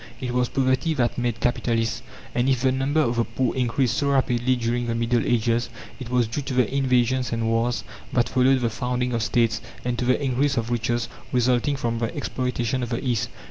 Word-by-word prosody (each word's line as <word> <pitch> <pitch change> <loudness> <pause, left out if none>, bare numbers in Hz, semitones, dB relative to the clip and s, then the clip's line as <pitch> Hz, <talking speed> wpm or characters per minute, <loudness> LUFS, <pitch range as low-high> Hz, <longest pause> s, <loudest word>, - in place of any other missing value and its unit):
It 125 -2 -3
was 125 0 +1
poverty 135 +4 +1
that 125 -2 0
made 120 -2 -1
capitalists. 115 -2 0 0.3
And 125 +2 +1
if 130 -3 +2
the 130 0 +3
number 135 +4 +1
of 120 -5 0
the 120 - +3
poor 130 +1 -1
increased 125 -1 +1
so 145 - +1
rapidly 130 -2 +2
during 120 0 -1
the 115 - -1
Middle 115 0 +1
Ages, 120 0 +1 0.3
it 130 -3 -7
was 125 -1 +2
due 115 +7 -3
to 135 -1 -4
the 125 0 +2
invasions 130 -1 +2
and 115 -1 -1
wars 115 +2 0 0.3
that 120 -2 +2
followed 130 +1 +3
the 120 -2 0
founding 125 +2 -2
of 115 - 0
States, 115 0 +1 0.2
and 125 -1 -1
to 125 - 0
the 125 - +3
increase 140 0 +1
of 115 +1 -1
riches 120 0 0 0.2
resulting 125 +2 +2
from 115 -3 -2
the 115 -1 -2
exploitation 125 -2 -2
of 120 - -3
the 120 +3 -3
East. 120 -1 0
125 Hz, 210 wpm, -24 LUFS, 120-130 Hz, 0.3 s, the